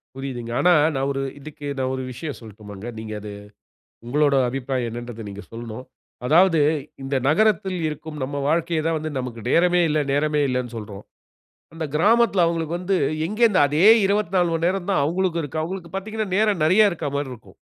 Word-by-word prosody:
புரியுதுங்க. 125 -4 -5
ஆனா 180 0 +5 0.2
நான் 135 +1 0
ஒரு 135 0 -2 0.2
இதுக்கு 145 0 -10
நான் 130 0 0
ஒரு 130 - -4
விஷயம் 145 +3 -6
சொல்லட்டுமாங்க. 105 -1 -10
நீங்க 110 -1 -6
அது 105 -1 -7 0.8
உங்களுடைய 140 +1 +3
அபிப்பிராயம் 130 -2 -2
என்னன்றத 120 -1 -7
நீங்க 100 +1 -8
சொல்ணும். 115 +1 -7 0.4
அதாவது 165 +2 +5 0.4
இந்த 135 +1 -2
நகரத்தில 190 0 +2
இருக்கும் 150 0 -7
நம் 140 +2 -3
வாழ்க்கையை 165 0 0
தான் 165 0 +1
வந்து 155 0 -4
நமக்கு 125 -3 -5
நேரமே 180 +1 +4
இல்லை 150 0 +1
நேரமே 150 +1 +1
இல்லைன்னு 125 -2 -2
சொல்றோம். 105 -2 -8 0.7
அந்த 165 -1 -4
கிராமத்தில 210 +1 +4
அவங்களுக்கு 165 0 -1
வந்து 185 +1 0 0.3
எங்கே 215 +5 -1
இருந்து 195 -5 +4
அதே 155 +7 +2 0.7
மணி 165 0 -1
நேரம் 190 0 -2
தான் 190 - +2
அவுங்களுக்கும் 170 +2 0
இருக்கு. 150 +2 -3
அவுங்களுக்கு 175 0 -6
பார்த்தீங்கன்னா 215 +1 -3
நேரம் 210 -7 +2
நெறைய 205 +5 +5
இருக்கிற 160 -4 -3
மாதிரி 140 -2 -2
இருக்கும். 115 - -16
150 Hz, 165 wpm, -23 LUFS, 125-180 Hz, 0.8 s, ஆனா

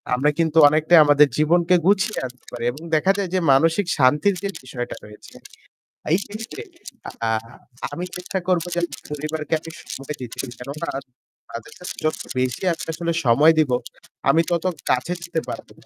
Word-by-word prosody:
আমরা 135 +4 +2
কিন্তু 160 -1 +1
অনেকটাই 155 +3 +5
আমাদের 145 0 +6
জীবনকে 170 +3 +3
গুছিয়ে 200 +2 +2
আনতে 125 0 -11
পারি 120 -1 -6
এবং 145 +5 -11
দেখা 185 +5 +4
যায় 195 -3 -1
যে 185 - +3
মানসিক 165 +8 +3
শান্তির 145 +8 +4
যে - - 0 0.2
বিষয়টা 125 -1 -5
রয়েছে 105 0 -14 0.8
এই 175 - +4
ক্ষেত্রে 220 - -7 0.7
আ - - +1 0.6
আমি 180 - -4
চেষ্টা 180 +1 -4
করব 180 -3 +2
যে - - +1 0.3
পরিবারকে 155 +1 -4
আমি 165 +1 -10 0.2
সময় 135 +2 -6
দিতে 120 -2 -7
পারি। 135 - -3
কেননা 145 +6 -5 0.6
তাদের 115 -1 -8
সাথে 180 - -7
যত 155 - +1 0.2
বেশি 125 -1 -1
আমি 165 - -10
আসলে 170 +1 -2
সময় 145 +7 +6
দিবো 135 -5 +3 0.5
আমি 165 - +5
তত 170 0 0 0.2
কাছে 130 +8 +1
যেতে 170 -1 -2
পারবো - - -7
155 Hz, 165 wpm, -22 LUFS, 135-175 Hz, 0.8 s, আমাদের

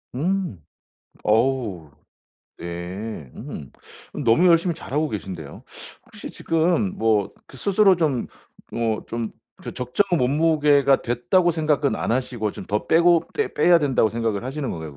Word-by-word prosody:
음 175 - -2 0.6
어우. 110 - 0 0.7
네 85 - -6
음. 70 - -9 0.5
너무 120 +11 +4
열심히 170 0 +4
잘하고 150 0 -2
계신데요. 90 - -7 0.4
혹시 - - -10
지금 175 +5 0
뭐 110 -3 +1
그 135 - -15
스스로 195 +3 +3
좀 150 -8 0 0.5
뭐 115 -2 -1
좀 115 -1 -4 0.3
그 - - -6
적정 125 +10 0
몸무게가 145 0 +3
됐다고 125 +10 +1
생각은 155 -3 +1
안 - - -3
하시고 120 -3 -1
좀 - - -9
더 105 +1 -2
빼고 170 0 +4
빼 435 - -1
빼야 175 -1 +5
된다고 135 -7 +2
생각을 115 -3 -2
하시는 135 +1 -4
건가요 80 -4 -7
130 Hz, 260 characters per minute, -23 LUFS, 110-165 Hz, 0.7 s, 빼야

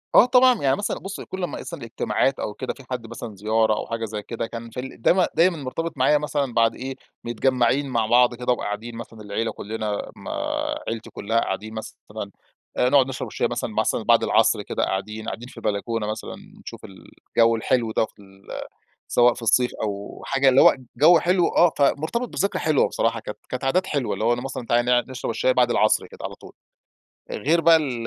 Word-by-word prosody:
آه، - - +9
طبعًا 250 -1 +5
يعني 135 -1 +3
مثلًا، 205 - -3
بُصّ، 195 +1 -7
كل 190 -1 -6
أما - - -3
يحصل 170 -6 -7
اجتماعات 130 +3 0
أو 105 - -3
كده، - - -4
في 135 - -15
حد 120 -3 -4
مثلًا 115 -2 -7
زيارة 110 +2 +2
أو 105 - -3
حاجة 115 0 -3
زي 105 -1 -5
كده، 115 +2 -5
كان 115 0 -8
في 120 - -7
ال 130 -2 -8
دايمًا 180 +8 +4
دايمًا 170 0 +4
مُرتبط 155 +3 -4
معايا 135 +3 +4
مثلًا 145 -4 -2
بعد 115 -1 +3
إيه، 130 +1 -5 0.3
متجمعين 130 +3 +1
مع 115 -3 +1
بعض 120 +1 +4
كده 125 +1 -1
وقاعدين 115 +1 -5
مثلًا 115 -1 -9
العيلة 105 +2 -2
كلنا 105 -1 -4
ما - - -8 0.6
عيلتي 115 -1 -4
كلها 115 +3 -1
قاعدين 110 +1 -3
مثلًا، 110 0 -8 0.5
آآ، 125 - +3
نقعد 135 -1 +5
نشرب 135 - -5
الشاي - - -1
مثلًا - - -4
مثلًا - - 0
بعد - - +4
العصر - - +3
كده - - -2
قاعدين، 105 +3 -3
قاعدين 120 - -6
في 125 - -15
البلكونة 110 0 -2
مثلًا 110 +1 -5 0.3
نشوف - - -9
الجو 115 +4 0
الحلو 115 0 0
ده 110 - +1
في 100 - -20
ال 95 0 -19 0.6
سواء 120 0 +4
في 120 - -10
الصيف 125 +2 +3
أو 100 -1 -5
حاجة، 135 0 +3
اللي 130 +1 +6
هو - - +7 0.2
جو 165 +3 +7
حلو، 180 +1 +2
آه. 175 - +4
فمُرتبط 155 - +1
بذكرى 200 - -1
حلوة 155 -3 +3
بصراحة، - - 0
كانت - - -8
كانت 125 +1 -4
عادات 180 +8 +1
حلوة، 140 -8 -1
اللي 105 +3 -3
هو 120 - +4
أنا 120 0 -2
مثلًا، 135 -2 -6
تعالَ 120 +1 +2
نقعد 125 +1 +2
نشرب 130 -2 -4
الشاي 130 +3 +2
بعد 125 -1 +3
العصر 110 -2 +2
كده، - - -15
على - - -4
طول. - - -14 0.8
غير 160 +10 +1
بقى 165 0 +6
ال 125 -7 -2
120 Hz, 205 wpm, -23 LUFS, 110-140 Hz, 0.8 s, آه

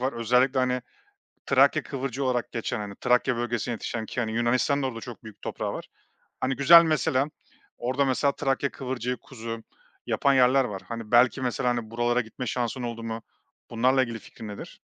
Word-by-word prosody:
var: 130 +2 0
Özellikle, 125 +3 +2
hani, 125 -1 +1 0.6
Trakya - - +4
kıvırcığı 135 0 -4
olarak 125 -2 -1
geçen, 115 -1 -2
hani, 100 -1 -6
Trakya 125 0 +2
bölgesinde 120 0 -2
yetişen 110 0 -4
ki, 125 - -3
hani, 110 -2 -2
Yunanistan'ın 125 +4 +1
da - - +1
orada 115 -3 -5
çok 120 -1 -10
büyük 110 -2 -12
toprağı - - -3
var. - - -6 0.5
Hani, 130 0 0
güzel 170 +5 +8
mesela 140 -4 +1 0.5
orada 130 +3 0
mesela 135 +2 +2
Trakya 135 0 -1
kıvırcığı 125 -2 -3
kuzu 115 -3 -7 0.4
yapan 140 -1 +2
yerler 130 +1 +5
var. 100 -4 -5
Hani, 115 -2 -6
belki 125 +2 +5
mesela, 125 0 0
hani, 120 -2 -2
buralara 120 +1 +1
gitme 120 +2 -7
şansın 120 +1 -2
oldu 115 -1 -4
mu? 115 0 -4 0.5
Bunlarla 130 +3 +3
ilgili 115 -2 -5
fikrin 110 - -11
nedir? 105 - -9
125 Hz, 175 wpm, -26 LUFS, 115-130 Hz, 0.6 s, güzel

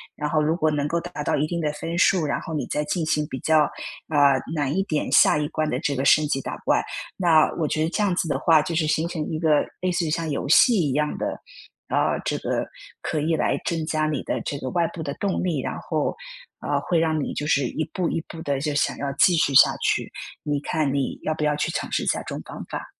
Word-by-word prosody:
然 150 - -3
后 155 0 +2
如 155 +2 +1
果 155 -3 +1
能 145 -1 -1
够 170 +2 0
达 170 -3 -6
到 - - +1
一 150 - +1
定 170 +1 -3
的 150 - 0
分 165 +2 -5
数， 175 -2 +3
然 145 - -1
后 - - -7
你 145 -5 -2
再 150 - -1
进 165 +2 -1
行 150 -1 +1
比 130 - -5
较， 160 -1 +4 0.5
呃， 140 -3 +4
难 145 -2 -1
一 195 - +2
点 155 -6 -2
下 - - +6
一 150 - -1
关 155 -1 -1
的 - - -1
这 140 - -1
个 130 - -1
升 150 +3 +5
级 135 -1 -1
打 - - -5
怪， - - +3 0.4
那 165 -4 +4
我 155 - +1
觉 155 +1 0
得 160 - 0
这 210 - -1
样 200 -3 +2
子 175 - -1
的 150 - -1
话， 160 -2 +5
就 165 +2 -3
是 160 -1 +1
形 160 +2 +1
成 165 -3 -3
一 155 - -2
个 155 -3 +3 0.2
类 185 0 0
似 180 0 0
于 - - -1
像 165 +1 -1
游 140 - -2
戏 185 - +5
一 - - -1
样 150 +1 0
的， - - -3 0.5
啊， - - +1
这 - - 0
个 - - -1 0.4
可 155 - -1
以 160 +2 +1
来 - - 0
增 165 -2 -1
加 155 -1 0
你 150 -2 -2
的 - - -2
这 145 - -4
个 130 - -4
外 170 -1 +1
部 165 - -7
的 140 - -3
动 195 -2 -1
力， 165 -7 0
然 - - -4
后， - - -2 0.5
呃， - - 0
会 170 -2 +1
让 160 -2 +1
你 - - -4
就 150 - -3
是 140 -3 +2
一 155 +5 -3
步 180 -3 0
一 165 - -1
步 165 - -9
地 140 -4 -1
就 150 +1 -2
想 145 - 0
要 140 -1 -3
继 175 +5 +4
续 150 -3 +2
下 - - +7
去， - - 0 0.3
你 145 -1 -1
看 150 -2 0
你 140 -2 -2
要 155 - 0
不 155 - -3
要 150 0 +2
去 150 - -1
尝 - - -4
试 - - 0
下 - - +1
这 - - -5
种 - - -6
方 - - -8
法？ - - -5
155 Hz, 285 characters per minute, -24 LUFS, 145-165 Hz, 0.5 s, 下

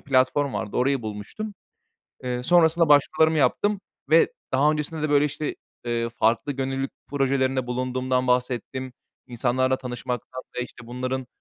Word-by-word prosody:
platform 135 +1 +2
vardı, 105 - -3
orayı 130 0 +2
bulmuştum. 110 - -6 0.7
Eee, 125 0 -2
sonrasında 165 +1 +4
başvurularımı 155 +2 +4
yaptım 205 +6 +2 0.3
ve 165 +1 +5 0.2
daha 140 +3 +4
öncesinde 155 +1 -3
de, 155 - 0
böyle, 145 0 +5
işte, 150 +1 -2 0.3
eee, 115 -1 -1
farklı 115 +4 +1
gönüllülük 135 0 -2 0.2
projelerinde 135 -2 +1
bulunduğumdan 130 +1 -1
bahsettim. 125 +1 -1 0.3
İnsanlarla 130 +2 +1
tanışmaktan 125 0 -5
ve, 125 - 0
işte, 120 -1 -10
bunların, 130 +1 -3
130 Hz, 130 wpm, -25 LUFS, 125-145 Hz, 0.7 s, ve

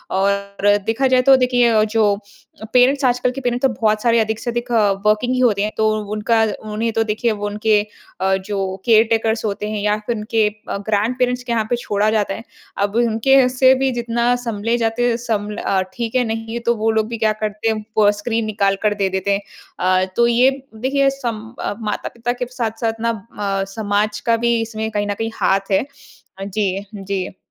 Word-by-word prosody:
और 200 +1 +1
देखा 240 +4 +1
जाए 255 -1 +4
तो 270 - +9
देखिए 245 -3 +3
जो 215 -2 +2 0.6
पेरेंट्स 265 +3 +4
आजकल 250 0 +2
के 270 - -6
पेरेंट्स 245 +1 0
तो - - -3
बहुत 215 -1 +2
सारे 235 0 +3
अधिक 220 0 0
से 240 - -4
अधिक 240 +1 -4
अ, 215 -4 +3
वर्कींग 215 +4 +2
ही 255 - 0
होते 215 -5 +3
हैं। 210 - -1
तो 220 0 +3 0.2
उनका 225 +1 +2 0.3
उन्हें 225 +2 -1
तो 225 - +2
देखिए 220 +2 0
वो 205 -1 -4
उनके 210 0 +2 0.4
अ, 190 0 +2
जो 190 -1 -4
केयरटेकर्स 225 -1 +3
होते 210 0 -3
हैं 210 -1 -3
या 210 0 +1
फिर 235 - 0
उनके 215 0 +1 0.2
ग्रैंडपेरेंट्स 245 +5 0
के 245 - -5
यहाँ 225 -2 +1
पे 245 - +2
छोड़ा 210 -3 0
जाता 210 -3 0
है। 225 - -7 0.3
अब 200 +1 -1
अ, - - +4
उनके 240 +3 +4
से 260 +1 +5
भी 265 0 +1
जितना 240 0 0
संभले 230 +1 -1
जाते 235 +1 +1
हैं 230 - 0
सम्भ्ल 210 -3 -3
अ, 190 -1 0
ठीक 235 0 -4
है 255 - +3
नहीं 225 0 -4
है 235 - -2
तो 235 0 +1
वो 220 0 0
लोग 220 -1 +1
भी 230 0 -5
क्या 220 -1 +2
करते 215 +1 -3
हैं, 215 -1 -2
वो 205 -1 +6
स्क्रीन 225 +2 -2
निकाल 200 -2 +1
कर 210 -1 +3
दे 200 -1 0
देते 190 +1 -1
हैं। 200 - -1 0.4
अ, 185 +1 +2
तो 235 0 +4
ये 240 +3 +4 0.3
देखिए 275 +4 +1
सम 245 -5 -4 0.2
अ, - - -2
माता-पिता 230 +3 -3
के - - +1
साथ-साथ 225 -2 -2
ना 230 0 +1 0.3
म 195 -1 -1
समाज 210 -1 0
का 230 -1 +3
भी 235 0 +1
इसमें 220 -1 -3
कहीं 205 -1 -1
न 205 - 0
कहीं 225 +2 -3
हाथ 195 +1 +1
है। 190 +6 +2 0.6
जी। 200 -1 -2
जी। 195 -1 -4
220 Hz, 205 wpm, -19 LUFS, 205-235 Hz, 0.6 s, तो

